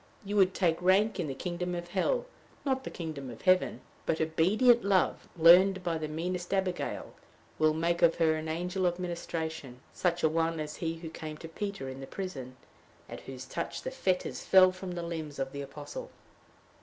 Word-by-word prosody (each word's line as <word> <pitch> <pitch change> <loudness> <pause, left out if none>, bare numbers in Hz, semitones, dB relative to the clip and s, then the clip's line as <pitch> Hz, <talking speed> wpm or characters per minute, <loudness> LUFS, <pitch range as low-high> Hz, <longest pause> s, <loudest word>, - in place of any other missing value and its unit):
You 205 +1 -3
would 190 -1 +4
take 170 -3 +1
rank 195 +4 +3
in 170 - -1
the 135 - -4
kingdom 180 +2 -3
of 175 0 -5
hell, 485 - 0 0.4
not 265 -1 0
the - - -3
kingdom 155 -6 -6
of 115 - -10
heaven. 185 0 +3 0.3
But 160 - +1
obedient 205 +10 +4
love, 195 -2 +1
learned 185 +3 +7
by 170 -2 -1
the 155 - -3
meanest 175 +3 -3
Abigail, 185 -2 -2 0.5
will 155 0 +4
make 170 +2 0
of 170 -1 +5
her 160 -2 +3
an 155 0 -3
angel 180 +3 -1
of 175 0 0
ministration, 160 -7 -4
such 175 -1 0
a - - +6
one 165 +1 0
as 150 0 -5
he 165 -1 -2
who 165 -1 -8
came 155 -1 -7
to 165 - -8
Peter 200 -2 -5
in 130 0 -7
the 135 - -7
prison, 135 -10 -6 0.5
at - - -8
whose 130 -1 -8
touch 170 +5 -4
the - - -3
fetters 190 -9 -1
fell 185 -1 +7
from 185 0 -6
the 175 -1 -4
limbs 160 -4 -5
of 135 -1 -2
the 140 0 -5
apostle. 145 - -7
170 Hz, 195 wpm, -30 LUFS, 155-185 Hz, 0.5 s, learned